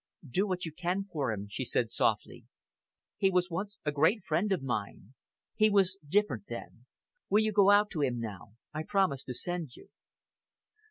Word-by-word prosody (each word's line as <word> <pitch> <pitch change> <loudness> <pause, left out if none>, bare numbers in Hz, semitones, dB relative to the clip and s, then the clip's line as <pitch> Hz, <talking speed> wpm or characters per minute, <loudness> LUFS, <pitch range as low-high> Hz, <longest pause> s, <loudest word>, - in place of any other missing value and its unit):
"Do 185 - 0
what 180 -2 -2
you 160 - -5
can 180 +4 -1
for 150 - -2
him," 105 -1 -4
she 100 - -4
said - - 0
softly. - - 0 0.7
"He 195 - +3
was 180 -1 +1
once 200 +4 -4
a 150 - +1
great 160 +9 +2
friend 185 +5 0
of 180 -8 0
mine. 110 -2 -4 0.4
He 215 0 +4
was 195 -2 +3
different 150 - +2
then! 120 +1 -9 0.4
Will 210 +2 +4
you 215 - +1
go 200 -1 +5
out 205 +1 +5
to 155 - -2
him 125 -4 0
now? 105 -3 -7 0.2
I 155 - -3
promised 155 -6 0
to 125 - -4
send 170 -4 -3
you." - - -16
175 Hz, 180 wpm, -31 LUFS, 130-195 Hz, 0.7 s, go